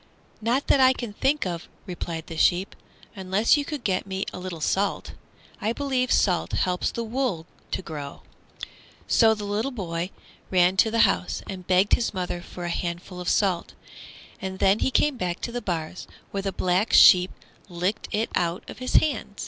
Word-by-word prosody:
"Not 240 +5 +1
that 280 - +4
I 260 0 +6
think 260 +4 -1
of," 175 -2 -4 0.2
replied 170 -3 -5
the 165 - -8
sheep, 180 +4 +2 0.4
"unless 195 +5 +2
you 290 - 0
could 290 -3 -6
get 190 0 -1
me 190 0 -3
a - - -6
little 180 -2 -6
salt. 195 +6 -1 0.5
I 220 +2 0
believe 260 -2 -1
salt 180 -4 +2
helps 180 -1 0
the 235 - -4
wool 230 -8 -2 0.2
to - - -3
grow." 145 -4 -7 0.8
So 220 -2 +5
the 210 +4 -2
boy 180 -7 -4 0.4
ran 180 0 +4
to 220 - +5
the 230 +1 +2
house 180 - -1
and 185 -2 -7
begged 185 +2 +3
his 230 -4 +1
mother 180 -1 -3
for 175 0 -8
a - - -2
handful 175 +1 -4
of 180 - -2
salt, 185 -4 +1 0.7
and 190 0 -4
then 195 +3 +3
he - - +1
came 280 +1 +2
back 180 -3 -2
to - - -3
the 245 +1 -4
bars, 170 -2 -4 0.2
where 200 - -2
the 195 0 -2
Black 185 +4 0
Sheep 180 0 +8 0.4
licked 180 +4 -2
it 215 +2 -1
out 170 0 -1
of - - -9
his 255 - -3
hand. 285 -9 +2
190 Hz, 180 wpm, -25 LUFS, 180-230 Hz, 0.8 s, Sheep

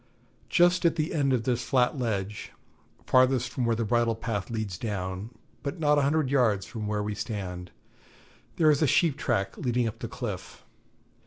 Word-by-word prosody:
Just 175 0 +4
at 170 -1 +3
the 155 +1 -1
end 140 -4 +1
of 125 -3 +1
this 120 0 0
flat 125 +2 +2
ledge, 105 -5 -3 0.5
farthest 130 -1 +3
from 125 - -1
where 115 - +2
the 115 0 -1
bridle 115 +1 +2
path 110 -4 -3
leads 110 -6 -4
down, 95 -1 -4 0.3
but 145 +5 -4
not 150 -2 +3
a - - +2
hundred 140 -1 +1
yards 110 -9 +2
from 105 +2 -6
where 105 0 -1
we 105 0 -2
stand, 95 -5 -5 0.9
there 155 -2 +5
is 145 - +1
a 155 - +4
sheep 160 0 +3
track 95 -8 -1
leading 120 -1 0
up 110 - -6
the - - -4
cliff. - - -6
120 Hz, 180 wpm, -27 LUFS, 105-140 Hz, 0.9 s, there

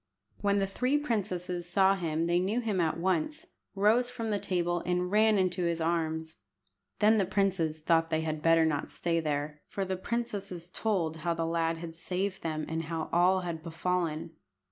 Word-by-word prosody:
When 200 0 +2
the 195 - +2
three 250 +8 +1
princesses 180 - -2
saw 190 +1 +4
him 165 -4 -1
they 175 +1 +2
knew 200 +6 0
him 215 -6 0
at 160 -1 0
once, 190 - -1 0.3
rose 220 +5 +3
from 230 -3 -4
the 205 - +1
table, 175 -2 0
and 180 0 0
ran 215 0 +4
into 180 -2 +1
his 170 -1 0
arms. 160 -2 -1 0.6
Then 215 +1 +5
the 195 - +2
princes 185 -5 0
thought 165 0 +2
they 160 -1 +1
had 155 -1 -3
better 165 0 +5
not 150 -2 -1
stay 170 -1 -1
there, 150 -1 -2
for 195 - -3
the 190 0 -2
princesses 195 -5 -4
told 180 -8 -1
how 170 +1 -1
the 165 0 -1
lad 165 0 0
had 165 0 -7
saved 185 +3 -3
them, 155 -1 -2
and 160 0 -3
how 160 0 -3
all 180 +2 +4
had 170 -3 -4
befallen. 165 -1 -2
175 Hz, 185 wpm, -30 LUFS, 165-195 Hz, 0.6 s, Then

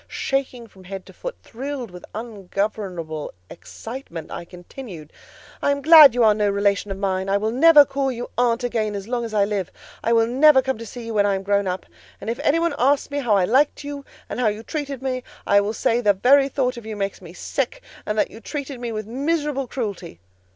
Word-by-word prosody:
Shaking 265 -3 -2
from 190 -4 -18
head 190 0 -7
to - - -14
foot, - - -6
thrilled 260 -2 -6
with 180 -1 -11
ungovernable 195 -7 -4 0.2
excitement, 225 -4 -9
I 170 - -6
continued— 175 - -11 0.5
"I - - +1
am 280 0 0
glad 305 -5 +9
you 245 - +3
are 215 -1 +6
no 210 -1 +1
relation 200 0 +1
of 195 - -4
mine: 190 -1 -1
I 200 - +3
will 215 +2 -1
never 295 +3 +7
call 270 0 -1
you 245 0 -6
aunt 245 0 +1
again 220 -4 -1
as 200 0 -6
long 240 0 -2
as 225 - -6
I 205 -2 +2
live. 200 -4 -3 0.3
I 230 - +1
will 230 -1 +4
never 265 +3 +5
come 265 -3 -2
to 230 - -7
see 240 +2 -8
you 230 - -5
when 205 -1 +3
I 200 - +2
am 190 - -4
grown 200 0 +1
up; 185 0 -3 0.3
and 225 - -3
if 235 - -5
any 290 - +3
one 335 0 +1
asks 280 +3 +2
me 285 - -1
how 235 -7 +2
I 190 -2 +3
liked 275 +8 +2
you, 285 -1 -6 0.2
and - - -5
how 245 - +2
you 215 +1 -2
treated 280 -2 -5
me, 255 -1 -2 0.2
I 200 0 +4
will 205 +1 -2
say 230 +2 +1
the 205 -3 +4
very 270 +7 +4
thought 255 -3 -1
of 235 - -9
you 220 - -5
makes 200 -1 -3
me 175 -3 -11
sick, 265 +7 -3 0.2
and 210 - -3
that - - +1
you 225 - -11
treated 280 0 -6
me 240 -1 -4
with 215 -1 -4
miserable 280 +2 -1
cruelty." 210 - -5
230 Hz, 230 wpm, -22 LUFS, 200-270 Hz, 0.5 s, glad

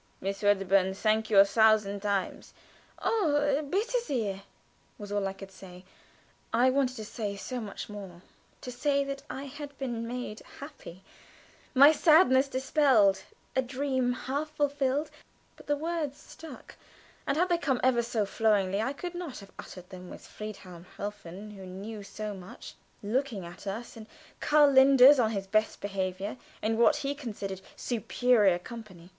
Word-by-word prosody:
"Miss 195 +1 -4
Wedderburn, 195 -2 +3
thank 215 +1 +1
you 210 - +3
a 195 - +9
thousand 210 -1 +3
times!" 200 -2 -3 0.4
"Oh, 290 -8 +1
bitte 415 +8 0
sehr!" 220 - -2 0.6
was 205 -1 -9
all 205 -1 0
I 190 - -4
could 195 0 -11
say. 180 -1 -13 0.7
I 250 +3 +4
wanted 260 -1 +1
to 220 -3 -7
say 205 -1 -4
so 250 +5 -5
much 205 -3 -7
more; 195 -4 -10 0.4
to 250 - -6
say 280 +3 +1
that 275 0 -5
I 270 - -5
had 285 0 -9
been 235 -4 -4
made 245 -3 -5 0.2
happy; 275 - -11 0.7
my 280 +3 +9
sadness 305 -4 +5
dispelled, 260 -7 +3 0.3
a 260 - +3
dream 260 -1 -1
half 280 +4 -3
fulfilled, 290 0 0 0.4
but - - -17
the 290 - +2
words 315 -2 -3
stuck, 315 -6 -12 0.5
and 275 - +1
had 360 +3 +2
they 345 -1 +2
come 270 -5 0
ever 250 -2 +4
so 230 -3 -1
flowingly 200 -2 +1
I 265 +5 -1
could 350 +4 -6
not 350 -6 -6
have 200 -1 -12
uttered 180 +1 -10
them 180 -1 -10
with - - -11
Friedhelm 185 -5 -9
Helfen, 205 0 -7
who 195 -2 -10
knew 205 +4 -7
so 210 +1 -6
much, 185 -1 -10 0.3
looking 225 -3 -1
at 175 +4 -11
us, 220 +5 -5
and 220 -1 -10 0.3
Karl 295 -1 +5
Linders 270 +1 +7
on 225 -3 +3
his 200 -3 -3
best 215 +2 0
behavior 195 +1 -3 0.3
in 220 +1 0
what 235 - +5
he 285 -1 -2
considered 205 -9 -6
superior 230 -5 +2
company. 185 -3 -11
225 Hz, 160 wpm, -29 LUFS, 200-275 Hz, 0.7 s, a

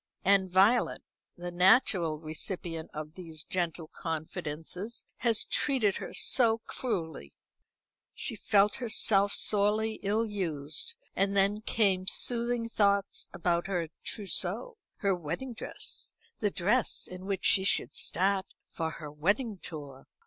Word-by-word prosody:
And 190 -1 +4
Violet, 195 +7 +3 0.3
the 175 0 -6
natural 180 - +4
recipient 165 +1 -4
of 155 0 -7
these 165 -3 -6
gentle 170 -3 -2
confidences, 165 +6 -5
had 230 -2 +2 0.2
treated 245 -9 +2
her - - -6
so 230 -3 +4
cruelly. 160 - -4 0.8
She - - -3
felt 205 0 +3
herself 205 -4 +4
sorely 215 +1 +3
ill 210 +3 +1
used; 175 - -3 0.2
and 200 +1 +1
then 200 +2 +2
came 195 -4 +1
soothing 235 +1 0
thoughts 200 -3 +1
about 170 +1 0
her 175 -4 -2
trousseau, 440 - -1 0.2
her 200 -1 +2
wedding 175 - -4
dress, 220 - -4 0.3
the 210 - +1
dress 210 +6 +1
in 185 +1 -9
which 195 -2 -2
she 190 - +5
should 195 - +1
start 190 +1 +1 0.2
for 160 -1 -2
her 150 -2 -8
wedding 200 - 0
tour. 145 -6 -9
195 Hz, 125 wpm, -30 LUFS, 165-215 Hz, 0.8 s, she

